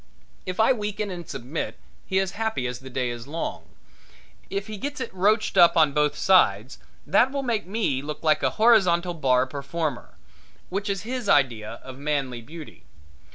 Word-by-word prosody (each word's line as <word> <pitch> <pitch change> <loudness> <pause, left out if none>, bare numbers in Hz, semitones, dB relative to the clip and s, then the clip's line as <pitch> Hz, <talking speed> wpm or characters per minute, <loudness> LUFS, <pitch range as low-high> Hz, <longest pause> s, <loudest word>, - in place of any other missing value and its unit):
If 185 +2 -4
I 225 +4 +5
weaken 210 -2 -3
and 175 -2 -8
submit 130 +6 -5 0.3
he 190 - 0
is 190 -1 +1
happy 220 - -2
as 125 0 -4
the 130 0 -10
day 125 -1 -2
is 120 +1 -8
long. 160 +3 -4 0.8
If 195 0 -3
he 215 0 -7
gets 285 +6 -5
it 230 -6 -5
roached 210 +4 +2
up 170 0 +7
on 155 -3 +4
both 150 0 +1
sides 130 - +3 0.3
that 220 - +3
will 280 0 -2
make 230 -7 -1
me 190 - -1
look 150 +2 -7
like 155 -1 +3
a - - +2
horizontal 185 -6 +4
bar 130 -5 +2
performer, 140 +1 -4 0.5
which 200 +3 -3
is 200 0 -2
his 245 -2 -4
idea 120 - +2
of 130 0 -10
manly 140 -4 -2
beauty. 155 +5 -11
170 Hz, 175 wpm, -25 LUFS, 135-205 Hz, 0.8 s, up